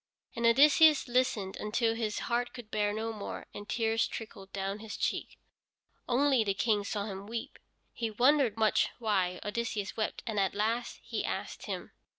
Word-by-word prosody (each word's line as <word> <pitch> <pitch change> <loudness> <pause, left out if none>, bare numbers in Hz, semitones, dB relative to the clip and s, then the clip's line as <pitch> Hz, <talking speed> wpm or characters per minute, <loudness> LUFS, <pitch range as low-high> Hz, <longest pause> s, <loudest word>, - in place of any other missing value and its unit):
And 235 -1 +2
Odysseus 295 +4 +6
listened 240 -6 0
until 225 +2 0
his 220 -2 -2
heart 240 +1 -1
could 230 -3 -10
bear 210 -1 +1
no 220 +2 -3
more, 210 -2 -6
and 205 0 -9
tears 225 -1 +1
trickled 200 -4 -8
down 195 +1 -3
his 220 -1 -7
cheeks. - - -2 0.7
Only 265 -1 +4
the 200 -2 0
King 210 -1 +2
saw 200 0 -2
him 200 -1 -6
weep. 230 +1 -5 0.3
He 230 -1 -2
wondered 245 0 +3
much 220 -1 +3
why 190 -6 0
Odysseus 210 -2 -2
wept, 215 -1 -2
and 220 -3 -1
at 195 -1 +1
last 225 +3 -1
he - - -3
asked - - -4
him. - - -5
220 Hz, 165 wpm, -31 LUFS, 205-235 Hz, 0.7 s, Odysseus